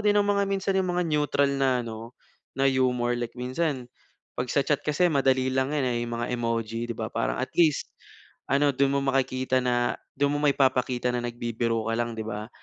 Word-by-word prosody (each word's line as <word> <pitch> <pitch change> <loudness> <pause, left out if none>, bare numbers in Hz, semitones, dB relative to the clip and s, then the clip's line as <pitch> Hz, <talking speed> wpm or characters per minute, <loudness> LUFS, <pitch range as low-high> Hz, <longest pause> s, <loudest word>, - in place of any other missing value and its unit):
din 205 0 +4
ng 205 - +2
mga 200 0 +2
minsan 195 0 0
yung 185 -1 0
mga 180 - +1
neutral 145 -2 +2
na 130 -2 +2
ano, 115 +1 -7 0.5
na 135 - +1
humor. 125 -2 +1
Like 120 0 -4
minsan 130 +1 -2 0.5
pag 125 0 -2
sa 140 - +3
chat 150 - +1
kasi 155 +4 +2
madali 130 -2 +2
lang 130 +2 0
yan, 140 - +1
eh, 120 -1 0
yung 120 0 -4
mga 120 - -2
emoji 115 -1 -2
'di - - -2
ba. 110 -1 -3
Parang - - -1
at 130 0 -3
least 160 -4 +3 0.6
ano 140 +1 +3
dun 140 +1 +2
mo - - +2
makikita 130 -1 +1
na, 120 -1 +1 0.2
dun 140 +1 +2
mo - - -1
maipapakita 130 -3 +2
na 120 - 0
nagbibiro 115 -1 -2
ka 115 - 0
lang 120 0 -1
'di 110 - -4
ba. 105 0 -5
130 Hz, 205 wpm, -26 LUFS, 120-140 Hz, 0.6 s, din